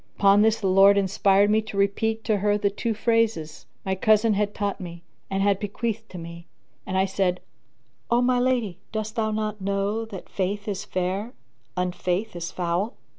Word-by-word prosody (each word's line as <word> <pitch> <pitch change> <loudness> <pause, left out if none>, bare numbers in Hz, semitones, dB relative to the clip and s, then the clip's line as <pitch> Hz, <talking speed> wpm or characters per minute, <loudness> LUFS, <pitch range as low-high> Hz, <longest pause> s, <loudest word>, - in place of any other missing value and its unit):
Upon 200 0 +5
this 220 +1 +3
the 200 - -4
Lord 195 +2 +6
inspired 200 +1 +3
me 220 +1 +3
to 215 -2 -8
repeat 220 +3 0
to 215 - +1
her 205 +1 +2
the 200 -1 0
two 225 +2 -2
phrases 220 -9 0 0.2
my 190 - 0
cousin 215 +3 +3
had 205 0 -1
taught 205 -1 -2
me, 170 -1 -8 0.3
and 195 0 0
had 200 -1 +2
bequeathed 220 +2 -3
to 185 - -9
me, 170 0 -9 0.4
and 190 -1 -1
I 190 - +3
said, 185 -2 0 0.7
"O 235 - +3
my 250 0 +2
lady, 240 -8 0
dost 215 0 -4
thou 220 -1 0
not 215 -1 -3
know 200 +3 -1
that 200 -4 -9
Faith 200 +2 -3
is 195 -2 -3
fair, 190 +6 -2 0.4
Unfaith 180 +2 -1
is 170 -1 -4
foul?" 180 +6 -1
200 Hz, 180 wpm, -25 LUFS, 190-220 Hz, 0.7 s, Lord